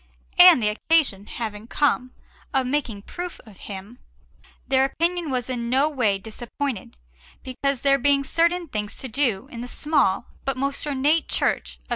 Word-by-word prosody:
And 355 -9 +9
the 210 - +3
occasion 215 -4 +1
having 220 -2 -6
come 255 -2 0 0.4
of 265 -1 +2
making 250 -7 -2
proof 355 +7 -7
of 210 -4 -15
him, 200 +5 -8 0.7
their 265 -1 +4
opinion 335 +4 -1
was 250 -3 -1
in 240 -2 -3
no 270 +4 +3
way 235 -9 +1
disappointed, 225 - -6 0.5
because, 265 +1 -2
there 275 0 +4
being 280 +1 +3
certain 340 +4 +1
things 210 -6 -4
to 265 - -5
do 245 -3 0
in 235 - -7
the 245 - -6
small 265 -8 +1 0.2
but 270 -1 -2
most 275 +2 -2
ornate 290 +3 +1
Church - - 0
of - - -34
S. - - -33
260 Hz, 165 wpm, -24 LUFS, 220-285 Hz, 0.7 s, And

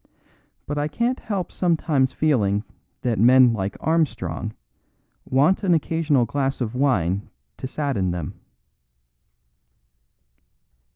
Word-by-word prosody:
But 145 0 -3
I 145 - 0
can't 235 - -1
help 195 -4 -4
sometimes 155 -6 +1
feeling 105 -10 +1 0.4
that 120 -4 0
men 125 +1 +6
like 100 -2 -3
Armstrong 115 - -1 0.7
want 145 +9 +2
an 180 -3 +4
occasional 155 -4 +1
glass 135 +3 -2
of 120 -3 -3
wine 100 -8 0 0.3
to - - -5
sadden 130 -10 -1
them." 85 -4 -4
130 Hz, 105 wpm, -23 LUFS, 110-155 Hz, 0.7 s, men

